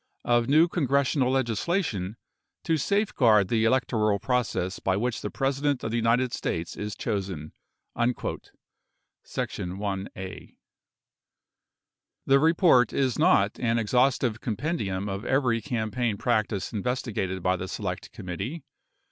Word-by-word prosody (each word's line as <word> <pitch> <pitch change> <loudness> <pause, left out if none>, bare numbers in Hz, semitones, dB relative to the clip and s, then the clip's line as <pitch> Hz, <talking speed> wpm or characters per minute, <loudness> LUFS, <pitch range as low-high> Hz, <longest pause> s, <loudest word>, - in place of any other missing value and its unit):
of 120 0 +2
new 155 +4 +6
congressional 140 -5 +1
legislation 120 - -1 0.5
to 165 - +1
safeguard 130 - +3
the 110 -1 +2
electoral 115 -4 +2
process 110 -5 -1
by 95 0 0
which 120 +2 -1
the 105 - -3
President 135 +2 0
of 110 - -2
the - - -1
United 120 +2 +2
States 85 +1 -3
is 105 0 -5
chosen." 95 -8 -4 1.7
[Sec. - - -3
1(a)] 95 0 -5 1.7
The 135 0 +5
report 160 - +4
is 130 -3 0
not 100 +2 +3
an 115 -1 +1
exhaustive 120 0 +1
compendium 105 - -2
of 100 +1 -4
every 125 -3 +1
campaign 115 -2 -1
practice 110 -3 -1
investigated 105 -5 -2
by 90 0 +2
the 95 +1 -5
Select - - -5
Committee. 100 - -5
115 Hz, 115 wpm, -27 LUFS, 100-130 Hz, 1.7 s, new